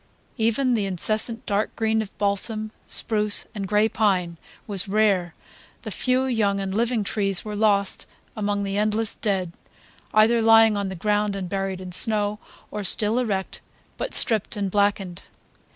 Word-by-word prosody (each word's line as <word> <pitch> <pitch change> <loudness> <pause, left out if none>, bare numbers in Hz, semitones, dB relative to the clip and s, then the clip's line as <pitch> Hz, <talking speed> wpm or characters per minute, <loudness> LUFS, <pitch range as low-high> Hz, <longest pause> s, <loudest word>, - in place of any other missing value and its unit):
Even 235 +3 0
the 210 -4 -1
incessant 215 +5 -1
dark 205 +1 -2
green 220 -1 -1
of 215 -2 -10
balsam, 215 +2 0 0.2
spruce 210 -2 0
and 200 -2 -6
gray 210 +2 +2
pine 185 -6 -1 0.3
was 200 -3 -2
rare; 195 -4 0 0.5
the - - -7
few 255 +1 0
young 210 -6 -1
and 195 -1 -5
living 230 0 -1
trees 195 -2 -2
were 210 -1 -6
lost 205 -2 -1 0.3
among 205 -2 -3
the 195 0 -4
endless 215 +1 -1
dead, 190 -5 -3 0.6
either 225 +2 +3
lying 225 -1 +5
on 200 -1 -3
the 190 - -7
ground 205 +2 -1
and 190 -2 -5
buried 195 -1 -4
in 185 -1 -9
snow, 210 +2 +6 0.3
or 210 - -5
still 215 +4 +2
erect 200 -6 -4 0.4
but - - -4
stripped 220 -1 +6
and 200 -2 -3
blackened. 200 -3 -1
210 Hz, 155 wpm, -22 LUFS, 195-220 Hz, 0.6 s, snow